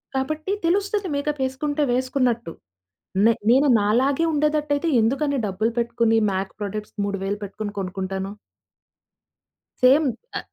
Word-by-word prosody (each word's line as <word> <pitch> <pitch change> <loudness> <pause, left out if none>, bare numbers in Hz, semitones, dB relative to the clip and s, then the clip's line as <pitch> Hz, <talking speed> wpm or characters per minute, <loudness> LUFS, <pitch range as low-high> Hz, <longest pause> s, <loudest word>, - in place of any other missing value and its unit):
కాబట్టి 310 +7 -2
తెలుస్తది 395 +1 0
మేకప్ 285 -1 -2
ఏసుకుంటే 290 +3 -2
వేసుకున్నట్టు. 250 -7 0 0.7
నే 230 - +6 0.2
నేను 275 +3 +5
నాలాగే 265 +9 +2
ఉండేదట్ట‌యితే 300 +1 +1
ఎందుకన్ని 275 +4 +1
డబ్బులు 215 +4 -1
పెట్టుకొని, 235 -1 +2
మ్యాక్ 190 +1 -3
ప్రొడక్ట్స్ 210 +2 -5
3,000 200 0 -2
పెట్టుకొని 205 +1 -5
కొనుక్కుంటాను. 190 +1 -4 1.5
సేమ్. 275 +5 +6 0.3
ఆ! - - -1
255 Hz, 110 wpm, -23 LUFS, 205-295 Hz, 1.5 s, నే